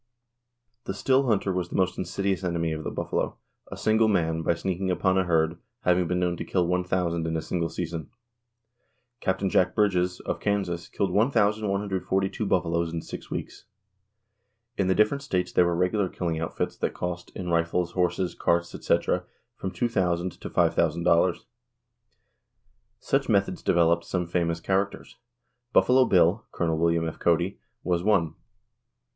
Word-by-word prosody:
The 95 - -4
still 130 +6 +2
hunter 100 -4 +1
was 90 -1 -2
the - - -6
most 95 -1 +1
insidious 95 0 -2
enemy 85 -2 -1
of 80 0 -4
the - - -3
buffalo, - - -2 0.3
a - - -6
single 110 +1 +3
man, 80 -5 +1
by 85 - +1
sneaking 95 +2 -2
upon 95 +1 +1
a 95 -1 +2
herd, 80 0 +1 0.2
having 90 -1 +2
been 90 +1 0
known 90 -1 0
to - - -4
kill 90 -2 0
one 90 +1 +1
thousand 85 -2 -1
in 80 0 -1
a - - -1
single 85 -2 -2
season. 80 0 -5 1.1
Capt. 95 0 0
Jack 90 0 +2
Bridges, 90 -4 +1
of - - -3
Kansas, 95 -5 -1
killed 95 -2 -1
1,142 100 -3 +1
buffaloes 85 -3 +1
in 80 -1 -4
six - - -8
weeks. - - -6 1.1
In 95 - 0
the 95 - +2
different 105 +7 +2
states 90 -9 -1
there 90 - +4
were 85 - 0
regular 90 +2 +1
killing 85 -3 -2
outfits 80 - -3
that - - -2
cost, 90 -1 -4
in 90 -1 -4
rifles, 85 +1 +1
horses, 90 0 0
carts, 85 0 0
etc., - - 0 0.3
from 95 - -4
$2,000 95 -6 -1
to - - -7
$5,000. 85 +2 +2 1.6
Such 135 +1 0
methods 100 -3 +1
developed 85 -1 +2
some 90 -2 -1
famous 85 -1 -1
characters. 95 +3 -2 0.6
Buffalo 130 +1 +5
Bill 95 +1 +3
(Col. 85 - -1
W. 85 0 +1
F. 80 - -6
Cody) 85 +3 +1 0.2
was 90 -1 0
one. 90 -6 +2
90 Hz, 155 wpm, -26 LUFS, 85-95 Hz, 1.6 s, Buffalo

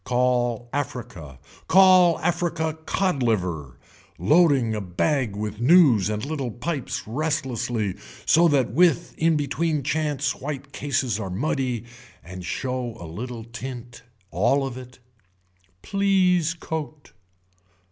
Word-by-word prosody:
Call 120 -2 0
africa, 115 - -5 0.3
call 185 -3 +6
african 165 -2 -1
cod 185 -8 0
liver, 90 - -1 0.4
loading 135 - +3
a 105 - -3
bag 110 - -1
with 105 +1 -5
news 130 - +5
and 105 +3 -3
little 140 -4 -3
pipes 130 +4 -4
restlessly 125 - -2 0.3
so 170 +2 +5
that 140 -6 +2
with 170 +5 +2
in 165 0 +3
between 150 +1 -1
chance 145 -1 -1
white 140 0 -6
cases 130 -6 -1
are 100 -3 -4
muddy 125 +3 -2 0.4
and 90 +1 -9
show 125 +4 -3
a 85 - -8
little 115 +8 -6
tint, 120 +1 -8 0.3
all 120 +10 +2
of 130 -2 -5
it. 125 0 -11 0.9
Please 185 -4 +2
coat. 155 - -6
130 Hz, 115 wpm, -24 LUFS, 115-155 Hz, 0.9 s, call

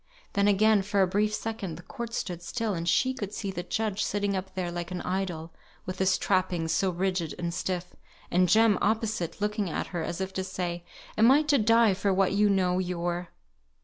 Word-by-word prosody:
Then 200 0 +3
again, 210 +1 +4
for 200 0 +2
a - - +2
brief 205 +3 +1
second, 215 -6 -4
the 175 - -11
court 235 +3 -6
stood 175 -3 -3
still, 220 +4 -2
and 170 -1 -2
she 260 +8 +2
could 205 -6 -5
see 200 -3 -3
the 175 - -4
judge, 215 +3 -1
sitting 205 -1 -1
up 190 0 -5
there 180 -2 -2
like 175 0 -4
an 180 -1 -4
idol, 180 -3 -3 0.3
with 185 0 -5
his 190 0 +3
trappings, 185 -4 0
so 190 - +2
rigid 180 -2 -1
and 170 -1 -3
stiff; 180 0 -3 0.4
and 180 0 +3
Jem, 220 +1 +5
opposite, 215 -5 -1
looking 210 -2 -1
at - - -2
her, 175 - -1
as 170 +2 -4
if 190 0 -3
to 190 - -2
say, 175 -2 -4 0.4
Am 225 +2 +7
I 285 +4 +6
to 290 -2 +3
die 230 -1 +5
for 195 +1 0
what 190 0 +2
you 205 +1 +3
know 185 -2 +2
your 175 -1 -2
190 Hz, 210 wpm, -28 LUFS, 175-210 Hz, 0.4 s, Am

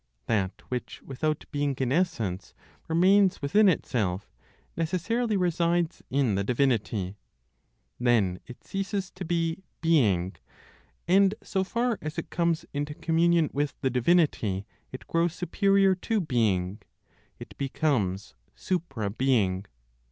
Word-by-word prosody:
That 100 -4 -1
which, 125 -1 -4
without 150 +3 -2
being 145 -2 0
in 130 -2 -1
essence, 110 - -1 0.3
remains 185 +4 +4
within 200 +9 +4
itself, 105 - -1 0.4
necessarily 200 +7 0
resides 175 -1 +1
in 135 -5 +1
the 100 +1 0
divinity. 105 -5 0 0.8
Then 110 -7 +2
it 125 - -12
ceases 195 -1 -3
to 185 - -7
be 165 0 -1 0.2
"being," 105 - +2 0.7
and 195 +3 +4
so 190 -2 -1
far 235 +3 -1
as 155 +1 -5
it 165 - -5
comes 170 -1 0
into 145 +1 -3
communion 165 -1 +2
with 145 +1 -1
the 130 - +1
Divinity 125 - +2 0.3
it 130 - -8
grows 165 0 0
superior 195 +1 +3
to 215 +4 -1
"being" 105 - 0 0.6
(it - - -10
becomes 105 - -1 0.2
supra 135 - -2
being). 105 -6 +1
150 Hz, 120 wpm, -27 LUFS, 110-175 Hz, 0.8 s, remains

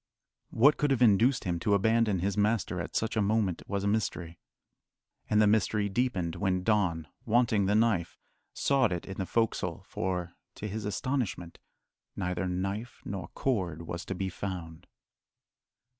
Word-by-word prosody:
What 140 +6 +5
could 145 - +1
have 130 -3 +3
induced 120 +4 +4
him 85 -3 -1
to 100 +3 +2
abandon 110 -2 +2
his 100 +1 0
master 105 -4 +1
at - - -7
such 110 +1 0
a 110 - +2
moment 100 -3 +1
was 100 0 -2
a - - 0
mystery. 90 -5 -2 0.9
And 105 - +3
the 105 - +6
mystery 105 0 +2
deepened 95 -7 -1
when 95 0 0
Don, 95 -7 +1 0.2
wanting 110 -4 +2
the 105 - +2
knife, 110 -7 +1 0.3
sought 135 -6 +2
it 90 -1 -3
in 95 - -7
the 95 - -2
"fo'csle," 115 -1 -1
for, 90 -2 -3 0.2
to 105 - -5
his 105 +1 -4
astonishment, 105 - -2 0.6
neither 90 0 -2
knife 95 +6 -4
nor 95 -3 -5
cord 90 - -1
was 85 +1 -5
to 95 - -4
be 95 +1 -2
found. 85 -3 -6
100 Hz, 160 wpm, -29 LUFS, 90-110 Hz, 0.9 s, the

